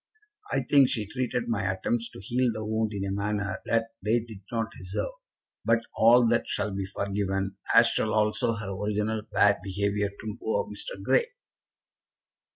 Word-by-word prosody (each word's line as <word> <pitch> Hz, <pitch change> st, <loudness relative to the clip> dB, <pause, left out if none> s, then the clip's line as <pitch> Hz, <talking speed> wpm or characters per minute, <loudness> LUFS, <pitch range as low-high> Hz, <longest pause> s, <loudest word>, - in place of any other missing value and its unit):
I -, -, +2 dB
think 140 Hz, -3 st, +5 dB
she 110 Hz, -3 st, -1 dB
treated 120 Hz, +2 st, -2 dB
my 115 Hz, -4 st, 0 dB
attempts 115 Hz, +5 st, -1 dB
to -, -, -12 dB
heal 120 Hz, +5 st, +1 dB
the 110 Hz, -1 st, -5 dB
wound 110 Hz, 0 st, 0 dB
in 100 Hz, -2 st, -3 dB
a 95 Hz, -, -2 dB
manner 100 Hz, 0 st, -1 dB
that 115 Hz, 0 st, +1 dB
they 110 Hz, +4 st, +2 dB
did 110 Hz, -4 st, -10 dB
not 115 Hz, -1 st, -1 dB
deserve; 95 Hz, -, -3 dB, 0.5 s
but 115 Hz, 0 st, +3 dB
all 120 Hz, +2 st, +6 dB
that 120 Hz, 0 st, +2 dB
shall 100 Hz, +1 st, -1 dB
be 95 Hz, 0 st, -2 dB
forgiven, 100 Hz, -1 st, -2 dB, 0.2 s
as 115 Hz, -, +9 dB
shall 110 Hz, -, 0 dB
also 110 Hz, +1 st, +2 dB
her 105 Hz, -3 st, -5 dB
original 105 Hz, +2 st, -1 dB
bad 100 Hz, 0 st, +4 dB
behaviour 100 Hz, +1 st, 0 dB
to 105 Hz, +2 st, -7 dB
poor 485 Hz, 0 st, -1 dB
Mr. -, -, -7 dB
Grey. 480 Hz, -1 st, +3 dB
105 Hz, 165 wpm, -27 LUFS, 100-115 Hz, 0.5 s, as